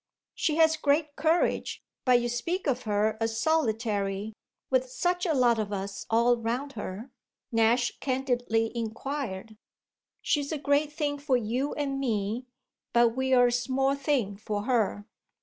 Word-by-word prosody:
"She 305 - 0
has 320 0 +4
great 295 0 +1
courage, 325 +2 0 0.2
but 250 -2 +5
you 240 - -1
speak 335 +11 -2
of 260 -4 0
her 215 +1 +1
as 225 0 -1
solitary 220 -8 0 0.4
with 255 -1 +2
such 355 +8 0
a 325 - +2
lot 240 -3 +3
of 210 -1 -2
us 195 0 -5
all 235 +2 +4
round 240 +5 -2
her?" 210 +3 -6 0.4
Nash 235 +2 +2
candidly 245 -4 0
inquired. 225 -2 -4 0.7
"She's 290 -1 0
a 315 - -1
great 285 +1 +1
thing 290 -1 -2
for 280 -3 +2
you 245 +5 -2
and 275 -2 -2
me, 225 -1 -1 0.5
but 235 0 +5
we're 260 +1 +3
a 245 - +3
small 265 +3 +1
thing 275 -8 -1
for 210 0 -3
her." 215 -4 0
245 Hz, 150 wpm, -28 LUFS, 225-280 Hz, 0.7 s, but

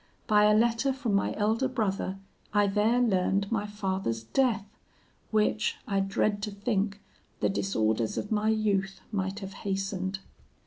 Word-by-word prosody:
By 210 -1 +5
a 210 0 +5
letter 235 +4 +2
from 260 -5 -2
my 200 - +1
elder 220 +5 +1
brother, 200 -6 -1 0.4
I 205 0 +5
there 210 +4 +2
learned 200 -3 +1
my 210 -2 0
father's 190 - -2
death, 225 - +1 0.6
which, 215 0 +1
I 200 -3 +1
dread 205 +1 0
to 210 - -2
think, 200 0 -1 0.4
the - - +2
disorders 110 - 0
of 205 - -3
my 215 0 +2
youth 200 -3 0
might 195 0 -2
have 195 0 -6
hastened. 195 -1 -2
205 Hz, 145 wpm, -29 LUFS, 195-215 Hz, 0.6 s, By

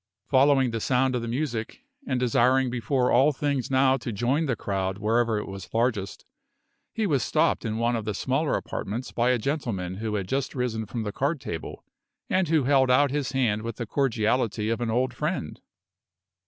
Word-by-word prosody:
Following 135 -2 +4
the 115 - -2
sound 130 +2 +1
of 120 - -1
the 115 - -4
music, 120 - -3 0.2
and 130 - 0
desiring 125 +1 +3
before 125 +2 0
all 135 +5 +5
things 140 -3 -2
now 130 0 +3
to 120 -2 -5
join 125 +9 0
the 125 - 0
crowd 95 -2 -2
wherever 115 +1 +1
it 105 - -4
was 95 -1 -8
largest, 115 -4 -1 0.7
he 220 - -1
was 145 -9 +1
stopped - - +1
in 110 -1 -2
one 120 +1 +1
of 115 - -2
the 105 -2 -2
smaller 135 +8 0
apartments 115 +6 -4
by 120 +1 +1
a 125 - +3
gentleman 110 - -3
who 110 0 -3
had 100 -3 -2
just 135 +4 -2
risen 115 -4 -2
from 115 +1 -4
the 105 - -3
card 140 +8 -1
table, 80 -10 -6 0.5
and 185 -2 +2
who 155 -2 +2
held 135 -1 +3
out 140 +2 +4
his 140 -2 -2
hand 115 -5 +1
with 115 0 -5
the 120 - -4
cordiality 115 -3 0
of 115 - -2
an 120 - -1
old 125 +3 0
friend. - - -3
125 Hz, 195 wpm, -26 LUFS, 110-135 Hz, 0.7 s, all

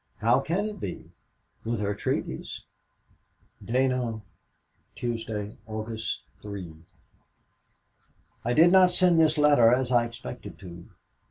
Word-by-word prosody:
How - - +3
can 185 +6 -1
it 210 -1 -5
be, 90 - -7 0.5
with 115 0 -2
her 105 -1 -1
treaties! 100 - -4 1.0
"DINANT, 125 -3 0 0.7
Tuesday, 110 -3 -4
August 110 +1 -4 0.2
3. 100 -5 -7 1.7
"I 120 - 0
did 165 +6 +6
not 185 -1 +7
send 180 -2 +3
this 160 -1 +4
letter 145 -6 +6
as 125 0 +1
I 120 -1 +4
expected 80 - -9
to. 85 -2 -11
115 Hz, 110 wpm, -27 LUFS, 105-150 Hz, 1.7 s, not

